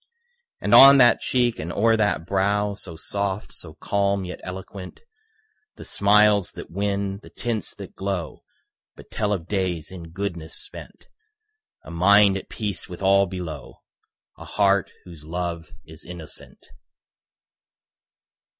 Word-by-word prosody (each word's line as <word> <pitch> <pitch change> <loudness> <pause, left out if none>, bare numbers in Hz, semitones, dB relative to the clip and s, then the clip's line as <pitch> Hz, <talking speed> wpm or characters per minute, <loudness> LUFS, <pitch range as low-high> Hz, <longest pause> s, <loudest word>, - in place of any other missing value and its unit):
And - - -1
on 140 +1 +10
that 125 -3 +6
cheek 120 -2 0
and 80 +3 -4
o'er 115 +4 +3
that 105 -6 0
brow 100 +2 0
So 85 -4 -8
soft, 100 +4 -3
so - - -10
calm 100 -1 -1
yet 90 - -7
eloquent, 95 0 -8 0.8
The - - -11
smiles 105 -1 +3
that - - -10
win, 100 +1 -2
the - - -14
tints 115 -4 -4
that - - -10
glow 95 -4 -4 0.5
But - - -16
tell 105 -2 -1
of 90 -4 -2
days 90 -5 -2
in 85 -3 -9
goodness 85 -3 -5
spent - - -9 0.8
A - - -11
mind 100 +3 +5
at 100 - -6
peace 105 -3 -4
with 90 +2 -8
all 100 0 +4
below, 85 -5 -8 0.6
A - - -10
heart 100 -2 +1
whose 85 -4 -12
love 85 0 -4 0.2
is 80 0 -12
innocent. 85 -2 -11
95 Hz, 135 wpm, -23 LUFS, 85-100 Hz, 0.8 s, on